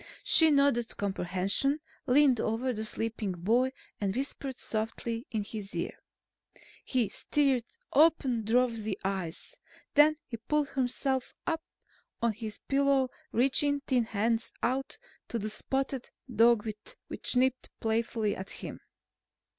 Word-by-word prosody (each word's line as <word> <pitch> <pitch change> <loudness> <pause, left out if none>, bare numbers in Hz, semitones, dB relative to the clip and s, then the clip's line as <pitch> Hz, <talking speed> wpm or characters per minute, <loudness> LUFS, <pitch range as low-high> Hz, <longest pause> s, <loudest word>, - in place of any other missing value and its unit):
She 320 -1 +7
nodded 280 -5 +2
comprehension, 195 - 0 0.3
leaned 260 -2 +5
over 240 +4 0
the 215 -1 -3
sleeping 220 -3 -2
boy 230 +9 +2 0.3
and 195 -1 -1
whispered 270 0 -3
softly 230 +2 -3
in 220 -4 -1
his 200 -2 -7
ear. 170 - -2 0.9
He 250 -5 +1
stirred, 270 0 +1 0.3
opened 270 -7 +4
drowsy 230 -3 +2
eyes. 190 -4 -4 0.3
Then 300 +1 +6
he 230 - -6
pulled 290 +5 0
himself 265 0 -1
up 325 -1 0 0.6
on 235 -1 +1
his 215 -1 -6
pillow, 275 -2 +3 0.2
reaching 280 +4 +2
thin 255 -4 +1
hands 225 +1 0
out 265 +3 -1 0.3
to 235 - -2
the 215 -1 -3
spotted 270 +1 -2 0.3
dog 230 0 +5 0.4
which - - 0
nipped 255 0 +2
playfully 225 -1 0
at 190 +1 -7
him. - - -6
235 Hz, 125 wpm, -30 LUFS, 220-270 Hz, 0.9 s, She